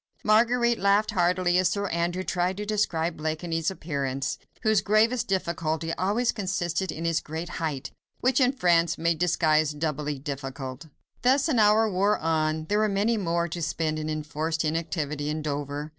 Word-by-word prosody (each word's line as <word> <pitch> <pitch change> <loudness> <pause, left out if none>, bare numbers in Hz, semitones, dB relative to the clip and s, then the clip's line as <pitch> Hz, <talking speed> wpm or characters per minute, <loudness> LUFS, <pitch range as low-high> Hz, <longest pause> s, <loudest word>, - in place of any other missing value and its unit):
Marguerite 235 +2 +3
laughed 200 +2 +3
heartily 180 0 +2
as 185 - +3
Sir 200 0 -1
Andrew 175 +2 -1
tried 180 0 -1
to 210 - -4
describe 175 -6 0
Blakeney's 160 +1 -2
appearance, 140 -7 -3 0.2
whose 220 -3 +3
gravest 225 +3 +2
difficulty 165 -3 -1
always 210 +8 +1
consisted 190 -2 -2
in 165 - -5
his 165 -1 +2
great 160 +3 -6
height, 150 -5 -3 0.3
which 255 +1 +2
in 255 0 +4
France 170 - +2
made 170 -1 0
disguise 155 -3 +2
doubly 150 -1 -2
difficult. 135 0 -6 0.3
Thus 265 +5 +3
an 255 -7 +2
hour 215 +1 +5
wore 200 +1 +2
on. 155 -1 0
There 205 +6 +1
were 215 0 +2
many 205 +4 +1
more 170 -4 0
to 170 +2 -5
spend 155 -1 -1
in 155 0 -3
enforced 155 +1 -2
inactivity 155 -2 -2
in 155 0 -3
Dover. 145 0 -3
170 Hz, 160 wpm, -26 LUFS, 155-200 Hz, 0.3 s, hour